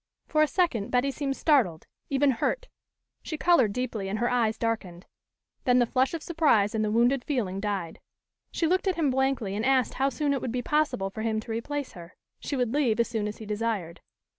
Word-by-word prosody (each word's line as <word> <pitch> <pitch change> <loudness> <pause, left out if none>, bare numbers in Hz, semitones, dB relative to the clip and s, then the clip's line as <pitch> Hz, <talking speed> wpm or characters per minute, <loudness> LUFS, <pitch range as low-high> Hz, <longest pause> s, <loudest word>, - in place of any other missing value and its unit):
For 310 - +1
a 310 - +5
second, 275 - 0
Betty 250 +2 +1
seemed 275 -1 -3
startled, 230 - +2 0.2
even 275 0 +3
hurt. - - -1 0.5
She 310 - -5
colored 300 -11 +4
deeply 225 -4 -3
and 205 - -2
her 240 +2 0
eyes 230 -3 +1
darkened. 200 -7 -3 0.6
Then 250 -1 +4
the 245 - +4
flush 260 +6 +1
of 325 - -6
surprise 295 -12 +2
and 220 -1 0
the 215 - 0
wounded 240 +4 +2
feeling 210 -10 -2
died. 195 -5 -3 0.5
She 335 - 0
looked 370 +4 +1
at 375 - +2
him 305 -5 +1
blankly 260 -6 0
and 215 - -2
asked 260 -1 +2
how 270 +1 +1
soon 280 +2 0
it 275 - -2
would 245 - -3
be 245 0 -2
possible 295 -10 0
for 220 - -6
him 220 -1 0
to 230 - -8
replace 280 +5 -3
her. 170 -1 -12 0.2
She 285 - -4
would 250 -2 0
leave 250 -7 +1
as 235 - +2
soon 220 -3 -2
as 210 - -6
he 220 - -9
desired. 210 -5 -3
245 Hz, 215 wpm, -27 LUFS, 215-280 Hz, 0.6 s, a